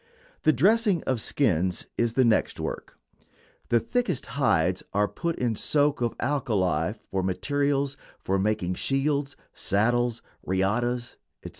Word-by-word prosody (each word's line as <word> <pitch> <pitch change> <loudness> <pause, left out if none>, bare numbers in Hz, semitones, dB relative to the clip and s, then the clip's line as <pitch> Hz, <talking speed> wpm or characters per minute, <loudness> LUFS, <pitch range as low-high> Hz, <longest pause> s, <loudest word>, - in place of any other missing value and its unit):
The 155 - +5
dressing 195 - +3
of 130 -4 -1
skins 90 - 0
is 120 -1 0
the 130 +1 +4
next 115 -2 +2
work. - - -5 0.7
The 120 - +4
thickest 205 - -1
hides 90 - +1
are 105 0 +3
put 170 +9 -3
in 120 -3 -1
soak 145 +3 +1
of 120 -1 0
alkali 100 - 0 0.2
for 95 - 0
materials 140 +8 0 0.2
for 95 0 -1
making 95 -3 0
shields, 140 +4 0 0.2
saddles, 120 +3 +1 0.2
riatas, 120 +6 -1 0.3
etc. - - -6
120 Hz, 130 wpm, -26 LUFS, 100-140 Hz, 0.7 s, The